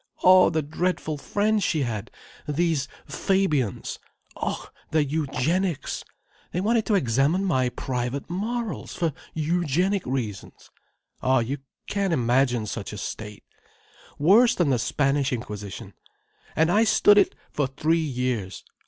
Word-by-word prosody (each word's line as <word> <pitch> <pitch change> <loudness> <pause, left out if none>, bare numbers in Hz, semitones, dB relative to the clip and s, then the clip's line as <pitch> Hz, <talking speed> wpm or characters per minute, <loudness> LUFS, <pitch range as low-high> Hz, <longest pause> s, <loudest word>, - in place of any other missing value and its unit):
Oh 185 0 +7
the 160 -1 0
dreadful 155 0 -2
friends 210 +6 +1
she 155 -5 +1
had—these 140 - -3 0.2
Fabians! 155 - 0 0.4
Oh, - - -4 0.2
their 155 -1 +3
eugenics. 155 +3 -1 0.5
They 180 - -1
wanted 220 +3 +1
to 215 - +3
examine 145 - +2
my 130 -9 +2
private 125 +2 -3
morals, 220 +4 -3
for 165 -4 0 0.2
eugenic 175 +4 +1
reasons. 115 -7 -5 0.5
Oh, 130 0 +3
you 130 +4 -1 0.3
can't 200 -3 0
imagine 125 -3 +2
such 100 -1 -5
a - - -6
state. 105 +1 -6 0.7
Worse 210 +11 +5
than 165 -6 +2
the 125 - +2
Spanish 140 +2 +1
Inquisition. 105 -5 -6 0.6
And 160 +3 +3
I 215 +4 +4
stood 205 -1 +6
it - - +2 0.2
for 145 -2 0
three 155 +5 +1
years. 125 -8 -2
150 Hz, 125 wpm, -25 LUFS, 125-185 Hz, 0.7 s, Oh